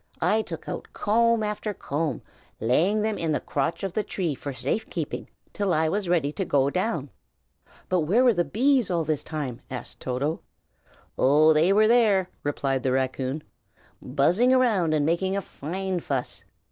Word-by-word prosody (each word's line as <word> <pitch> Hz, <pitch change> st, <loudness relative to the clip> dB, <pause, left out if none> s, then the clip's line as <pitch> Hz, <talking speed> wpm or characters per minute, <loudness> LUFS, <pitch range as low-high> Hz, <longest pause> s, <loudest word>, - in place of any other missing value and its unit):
I 200 Hz, +6 st, +2 dB
took -, -, -7 dB
out -, -, -5 dB
comb 230 Hz, +1 st, +2 dB
after 210 Hz, 0 st, -3 dB
comb, 145 Hz, -4 st, -3 dB, 0.4 s
laying 175 Hz, -, +2 dB
them 220 Hz, -1 st, -1 dB
in 165 Hz, -2 st, 0 dB
the -, -, +1 dB
crotch 145 Hz, +7 st, -2 dB
of 195 Hz, -3 st, -3 dB
the 215 Hz, -, +1 dB
tree 180 Hz, -6 st, -2 dB
for 140 Hz, +1 st, -6 dB
safe 130 Hz, -, -2 dB
keeping 160 Hz, -4 st, -4 dB, 0.2 s
till 200 Hz, -4 st, 0 dB
I 160 Hz, 0 st, +2 dB
was 195 Hz, +1 st, -2 dB
ready 160 Hz, -5 st, +2 dB
to 190 Hz, -, -3 dB
go 140 Hz, -5 st, +2 dB
down." 170 Hz, -, -2 dB, 0.8 s
"But 185 Hz, -, +1 dB
where 190 Hz, +11 st, +3 dB
were 245 Hz, -2 st, +5 dB
the 175 Hz, -3 st, +1 dB
bees 255 Hz, +3 st, +2 dB
all 170 Hz, -2 st, +1 dB
the 155 Hz, 0 st, +1 dB
time?" 140 Hz, -6 st, -5 dB
asked 125 Hz, -2 st, -6 dB
Toto. 135 Hz, +5 st, -2 dB, 0.8 s
"Oh, 150 Hz, +4 st, +5 dB
they 160 Hz, +5 st, +4 dB
were 215 Hz, +2 st, +5 dB
there!" 215 Hz, -6 st, +3 dB
replied 135 Hz, -2 st, -1 dB
the 130 Hz, -, 0 dB
raccoon, 130 Hz, +2 st, -1 dB, 0.6 s
"buzzing 170 Hz, -, +2 dB
about 225 Hz, -11 st, +3 dB
and 145 Hz, -1 st, +1 dB
making 190 Hz, +4 st, 0 dB
a -, -, -1 dB
fine 185 Hz, +4 st, -4 dB
fuss. 135 Hz, -6 st, -4 dB
170 Hz, 170 wpm, -25 LUFS, 145-205 Hz, 0.8 s, were